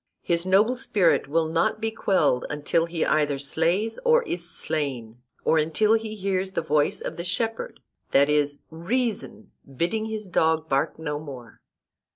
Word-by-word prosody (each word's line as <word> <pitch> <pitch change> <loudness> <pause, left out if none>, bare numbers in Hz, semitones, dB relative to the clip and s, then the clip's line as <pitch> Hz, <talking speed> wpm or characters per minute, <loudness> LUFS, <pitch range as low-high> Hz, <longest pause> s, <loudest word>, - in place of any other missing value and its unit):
His 170 +1 0
noble 210 +7 +3
spirit 180 - +2
will 160 +3 +1
not 165 +5 0
be 225 0 -1
quelled 155 - +1
until 150 +3 0
he 165 -1 -1
either 150 -2 +1
slays 170 +10 0
or 480 0 +4
is 175 - -5
slain; 125 -9 -3 0.2
or 160 - +4
until 165 +8 +2
he 220 -1 -1
hears 190 -1 -2
the - - -1
voice 150 -1 +1
of - - -5
the 170 - -4
shepherd, 225 - -2 0.3
that 140 +1 +4
is, 145 -1 0
reason, 215 +4 -3 0.3
bidding 215 - 0
his 220 -1 -4
dog 160 -3 +1
bark 135 -1 0
no 150 -2 -3
more. 130 -7 -10
170 Hz, 160 wpm, -25 LUFS, 150-215 Hz, 0.3 s, or